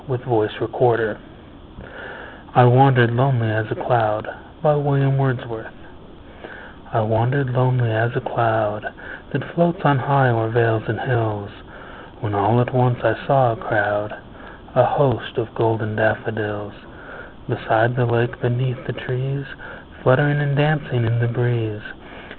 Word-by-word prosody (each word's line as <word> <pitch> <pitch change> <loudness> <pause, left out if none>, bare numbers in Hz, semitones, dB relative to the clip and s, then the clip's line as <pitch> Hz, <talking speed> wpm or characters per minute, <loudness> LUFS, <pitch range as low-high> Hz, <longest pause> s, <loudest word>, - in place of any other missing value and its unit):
William 125 -1 -5
Wordsworth 115 0 0 1.4
I 125 - +8
Wandered 125 -1 +6
Lonely 125 -3 +1
As 110 0 -2
a - - -3
Cloud 110 -2 0 2.6
I 115 - +1
WANDERED 120 +5 0
lonely 125 -2 +1
as 110 +2 +1
a - - 0
cloud 110 -4 -1 0.4
That - - -3
floats 170 +1 +1
on 145 -2 +4
high 135 +1 +3
o'er 115 -1 0
vales 115 -2 +1
and 115 -2 -3
hills, 110 -5 -2 0.7
When 105 - -5
all 100 +4 +2
at 125 - -2
once 125 -1 +2
I 115 - +3
saw 135 -4 +4
a - - -3
crowd, 105 -2 -2 0.6
A - - +5
host, 130 -7 0
of 115 +2 -4
golden 110 -2 -1
daffodils; 105 -2 -2 0.7
Beside 115 +2 +1
the 125 -2 +1
lake, 120 +1 -1
beneath 125 +1 -2
the 130 - -4
trees, 135 +2 -4 0.6
Fluttering 145 +3 +3
and 140 -1 -1
dancing 145 -5 0
in 115 +1 0
the 120 - +1
breeze. 115 -3 -2
120 Hz, 125 wpm, -20 LUFS, 110-130 Hz, 2.6 s, I